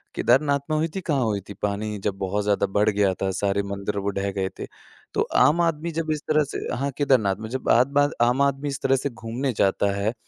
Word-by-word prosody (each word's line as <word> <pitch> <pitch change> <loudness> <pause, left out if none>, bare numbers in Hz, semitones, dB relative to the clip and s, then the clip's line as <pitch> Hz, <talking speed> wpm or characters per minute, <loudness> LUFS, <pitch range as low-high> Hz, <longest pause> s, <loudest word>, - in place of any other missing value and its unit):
केदारनाथ 140 +3 +3
में 155 - +1
हुई 160 +2 +1
थी, 190 - -2
कहाँ 140 -7 0
हुई 105 -3 0
थी? - - -6
पानी 105 +1 -2
जब 100 -2 -1
बहुत 100 +2 -1
ज़्यादा 100 -1 +1
बढ़ 105 +2 +2
गया 100 -2 +2
था, 95 - +1
सारे 100 +1 0
मंदिर 100 +1 -4
वो 100 0 -1
ढह 100 0 -2
गए 95 -1 -2
थे। - - -4 0.5
तो - - +1 0.2
आम 170 +3 +5
आदमी 165 0 0
जब 160 -1 -2
इस 150 -1 -2
तरह 155 -1 +3
से - - -3 0.2
हाँ, 140 +2 -2
केदारनाथ 125 -9 +3
में 110 0 -6
जब 130 +1 -3
बार-बार 140 +4 +3
आम 125 +3 +3
आदमी 140 +1 +1
इस 135 - -4
तरह 135 0 +3
से 140 +2 -1
घूमने 120 +3 -3
जाता 100 +1 +2
है, 105 +3 -1
115 Hz, 235 wpm, -24 LUFS, 100-140 Hz, 0.5 s, आम